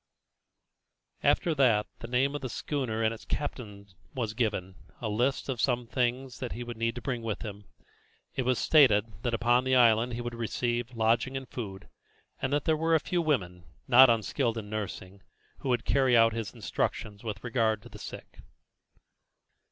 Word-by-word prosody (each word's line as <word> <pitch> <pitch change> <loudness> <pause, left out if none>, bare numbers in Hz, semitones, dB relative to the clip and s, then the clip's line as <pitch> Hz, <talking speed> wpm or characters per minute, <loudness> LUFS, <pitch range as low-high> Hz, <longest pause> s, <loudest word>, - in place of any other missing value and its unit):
After 170 -5 +2
that 120 -8 +3
the 115 - -7
name 130 +3 +1
of 145 - -4
the 130 - -4
schooner 120 -5 -2
and 110 0 +2
its 115 - -10
captain 105 -8 -5 0.3
was 115 -5 -2
given, 105 -5 -1 0.3
a 115 - -3
list 120 +6 0
also 135 - -2
of 120 - -5
some 125 -2 +2
of 120 - -17
the - - -25
things 125 0 -1
that 125 -3 -4
he 120 - -5
would 120 0 -6
need 115 0 -1
to 125 - -7
bring 125 -1 -2
with 115 -1 -4
him. 105 -2 -8 0.7
It - - -1
was 125 -1 +1
stated 125 -9 +5 0.2
that 120 -1 0
upon 120 +2 +3
the 130 0 +2
island 120 -1 +4
he 120 - -3
would 120 0 -5
receive 120 +1 -2
lodging 115 +4 +1
and 135 -1 -7
food, 100 -6 -7 0.5
and 135 - -1
that 145 -1 0
there 160 - +3
were 165 +1 +2
a - - +4
few 175 +3 -1
women, 90 - -1 0.2
not 130 +1 +8
unskilled 115 +1 0
in 105 -2 -6
nursing, 100 -2 -5 0.4
who 135 - -4
would 120 -2 +1
carry 130 -3 +4
out 115 0 +5
his 115 -4 -4
instructions 105 0 -3
with 105 -3 -5
regard 115 -4 0
to - - -12
the - - -12
sick. - - -10
120 Hz, 190 wpm, -29 LUFS, 110-130 Hz, 0.7 s, not